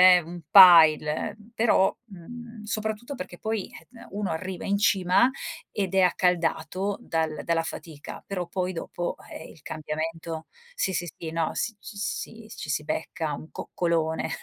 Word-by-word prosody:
eh, 180 - +3
un 175 +2 -9
pile 165 -1 +7 0.2
però, 220 -4 +3
mhmm, 230 +3 -10
soprattutto 220 +4 -3
perché 180 -8 -7
poi 220 -3 -3 0.4
uno 200 -2 -3
arriva 185 +2 -4
in 200 0 +1
cima 195 +3 +4 0.4
ed 195 -3 -2
è 190 - +5
accaldato 180 +1 +1
dal 160 -7 -2
dalla 165 -1 +1
fatica 155 -2 -8
però 180 -3 -3
poi 185 +1 -2
dopo, 175 +1 -4 0.2
eh 160 - -8
il 150 - -18
cambiamento 160 +1 -4 0.3
sì 345 - -1
sì 175 - -1
sì, 165 - -6
no, 165 0 -1
s 225 0 -2
s 205 0 -4
si, 225 -1 -10
ci 145 - -4
si 150 - -1
becca 160 0 -3
un 155 +2 -8
coccolone. 165 -2 -1
180 Hz, 150 wpm, -26 LUFS, 160-205 Hz, 0.4 s, pile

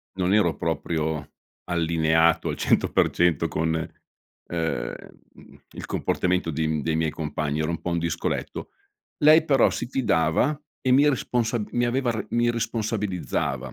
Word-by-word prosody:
Non 95 +1 +1
ero 105 - +3
proprio 80 -1 -2 0.3
allineato 80 -1 +2
al - - -3
100% 85 -4 +2
con, 80 0 -1
ehm, 80 -3 -5 0.4
uhm, - - -18
il - - -8
comportamento 90 -2 0
dei 80 +1 -1
m 75 -1 -1
dei 80 +1 0
miei 80 -1 0
compagni, 75 -1 -3
ero 80 +1 -1
un 85 - -3
po' 90 - -3
un 85 - 0
discoletto. 85 0 -3 0.5
Lei 155 +2 +6
però 140 -4 +4
si - - -4
fidava, 125 - +1 0.2
e 130 - 0
mi 140 +3 +5
responsab 120 -5 -1
mi 120 - +1
aveva 120 +1 0
re 110 -2 -3
mi 120 0 +2
responsabilizzava, 100 - -2
85 Hz, 145 wpm, -25 LUFS, 80-120 Hz, 0.5 s, Lei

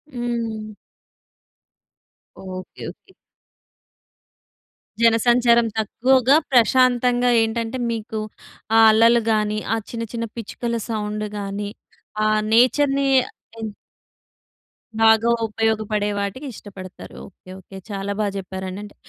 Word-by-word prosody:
హ్మ్. 230 -3 -3 1.7
Okay. 185 -1 -9
Okay. 380 - -24 1.9
జనసంచారం 235 +1 +4
తక్కువగా, 255 +5 +3 0.2
ప్రశాంతంగా 245 0 +3
ఏంటంటే 225 +2 -2
మీకు 220 -1 -4 0.6
ఆహ్, 225 - +8
అలలు 230 +2 +5
గాని, 215 -1 0
ఆహ్, 225 -1 -2
చిన్న 230 -1 -4
చిన్న 230 -1 -2
పిచ్చుకల 235 +1 -4
సౌండ్ 210 -1 -3
గాని 200 0 -4 0.6
ఆహ్, 215 0 +2
నేచర్‌ని 275 +3 +3 0.5
హ్మ్. 220 -1 -5 1.3
బాగా 225 +1 +5 0.2
ఉపయోగపడే 215 -1 -1
వాటికి 200 +8 -4
ఇష్టపడతారు. 190 -3 -11
ఓకే. 185 -1 -19
ఓకే. 190 +1 -12
చాలా 200 0 -4
బాగా 210 -2 0
చెప్పారండి. 190 0 -6
అంటే 205 - -12
225 Hz, 95 wpm, -21 LUFS, 210-235 Hz, 1.9 s, ఆహ్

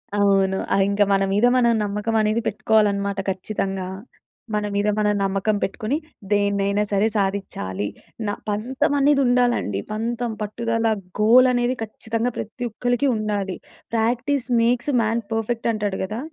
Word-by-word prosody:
అవును. 195 -1 +3 0.2
ఆహ్, 195 - +4
ఇంకా 200 +1 +3
మన 195 0 +3
మీద 210 +4 +3
మనం 235 -1 +4
నమ్మకం 210 +2 -2
అనేది 215 +2 +1
పెట్టుకోవాలనమాట 200 -2 +1
ఖచ్చితంగా. 190 0 -3 0.7
మన 210 0 0
మీద 205 +1 +1
మనం 210 -1 +2
నమ్మకం 195 +2 0
పెట్టుకొని 220 +8 -1 0.3
దేన్నైనా 200 0 +2
సరే 200 +2 +3
సాధిచ్చాలి. 190 - -2 0.4
న - - 0 0.2
పంతం 260 +8 0
అనేది 280 0 +4
ఉండాలండి. 245 - +2
పంతం, 235 +2 -2
పట్టుదల, 230 +2 -1 0.3
గోల్ 245 +4 +6
అనేది 245 +1 +1
ఖచ్చితంగా 225 +2 -3
ప్రతి 235 +3 -5
ఒక్కళ్ళకి 245 +4 0
ఉండాలి. 205 -3 -2 0.4
ప్రాక్టీస్ 245 +4 0
మేక్స్ 245 +4 +1
మాన్ 225 +1 0
పర్ఫెక్ట్ 225 +1 -1
అంటాడు 205 -3 -2
కదా! 215 +5 -4
215 Hz, 130 wpm, -22 LUFS, 200-235 Hz, 0.7 s, గోల్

